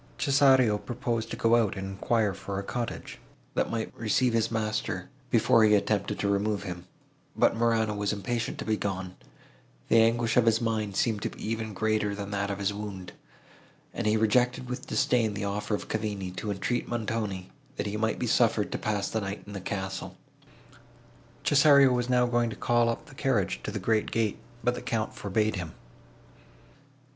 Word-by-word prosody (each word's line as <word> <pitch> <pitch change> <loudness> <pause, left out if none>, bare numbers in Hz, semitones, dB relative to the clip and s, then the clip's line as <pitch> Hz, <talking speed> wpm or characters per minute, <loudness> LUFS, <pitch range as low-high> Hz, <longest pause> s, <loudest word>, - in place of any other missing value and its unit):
Cesario 130 -6 +4
proposed 120 -2 -3
to - - -5
go 115 +1 +4
out, 110 -4 +1
and 95 - -4
enquire 105 +2 0
for 95 0 -5
a 100 - -3
cottage, 120 +3 -5 0.3
that - - 0
might 115 -1 -3
receive 115 +2 +1
his 115 -1 +2
master, 105 -4 -2 0.2
before 115 0 +4
he 105 -1 +6
attempted 100 -1 0
to 100 - -1
remove 100 0 0
him: 90 -2 -7 0.5
but - - +3
Morano 115 -2 +2
was 100 0 -1
impatient 115 +3 -2
to - - -5
be 110 0 +1
gone; 95 -3 -4 0.7
the 115 - +6
anguish 115 +1 +2
of 120 -2 +4
his 115 0 +4
mind 110 -3 -1
seemed 110 -2 +1
to - - -1
be - - -8
even 110 -2 -3
greater 110 -1 0
than 100 0 -6
that 100 0 -1
of 100 - -2
his 100 0 -1
wound, 100 -3 -6 0.8
and - - -2
he 105 +1 +3
rejected, 125 +3 +2
with 125 0 -5
disdain, 120 -6 +1
the 100 0 -3
offer 105 +1 -1
of - - -7
Cavigni 105 -4 -3
to 105 - -4
entreat 100 +4 -1
Montoni, 110 -5 -3 0.2
that - - -3
he 105 0 -3
might 110 +1 0
be - - -2
suffered 115 -2 +2
to - - -3
pass 105 -2 -1
the 110 - -2
night 100 +1 -5
in 100 - -9
the 100 - -5
castle. 95 0 -4 1.3
Cesario 140 -2 +6
was 125 0 -1
now 125 -1 +4
going 120 -1 +1
to 110 - -6
call 120 -1 +2
up 115 - -3
the 150 - -15
carriage 120 -9 0
to - - -5
the 105 - -4
great 110 +2 +1
gate, 110 -3 0 0.2
but 125 - +2
the - - -6
Count 110 -2 -2
forbade 105 +1 0
him. 90 -3 -5
110 Hz, 190 wpm, -28 LUFS, 100-115 Hz, 1.3 s, he